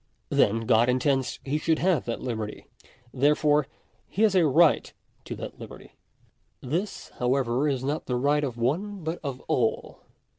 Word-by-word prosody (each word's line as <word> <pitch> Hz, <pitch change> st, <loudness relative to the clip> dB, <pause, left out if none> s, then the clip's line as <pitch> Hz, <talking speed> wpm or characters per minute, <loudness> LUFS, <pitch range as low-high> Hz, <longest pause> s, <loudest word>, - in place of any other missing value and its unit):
Then 115 Hz, +3 st, +2 dB
God 115 Hz, +1 st, +3 dB
intends 130 Hz, 0 st, 0 dB
he 145 Hz, +3 st, -1 dB
should 160 Hz, 0 st, +1 dB
have 175 Hz, -6 st, +1 dB
that 115 Hz, -, -4 dB
liberty. 110 Hz, -4 st, -4 dB, 0.5 s
There 145 Hz, +3 st, +3 dB
J -, -, -13 dB
fore 150 Hz, -2 st, +3 dB, 0.4 s
he 210 Hz, -, -1 dB
has 215 Hz, -3 st, +4 dB
a 180 Hz, -4 st, +4 dB
right 160 Hz, +3 st, +4 dB, 0.3 s
to -, -, -5 dB
that -, -, -8 dB
liberty. -, -, -11 dB, 0.7 s
§3. 125 Hz, -, -8 dB
This, 190 Hz, +6 st, -3 dB
however, 125 Hz, +2 st, +1 dB
is 130 Hz, -2 st, -2 dB
not 145 Hz, +3 st, -2 dB
the 125 Hz, -, -1 dB
right 145 Hz, +4 st, +2 dB
of 125 Hz, -4 st, -3 dB
one 175 Hz, -, -2 dB
but 160 Hz, +2 st, -3 dB
of 135 Hz, -3 st, -5 dB
all. 115 Hz, -3 st, -1 dB
140 Hz, 175 wpm, -26 LUFS, 125-155 Hz, 0.7 s, has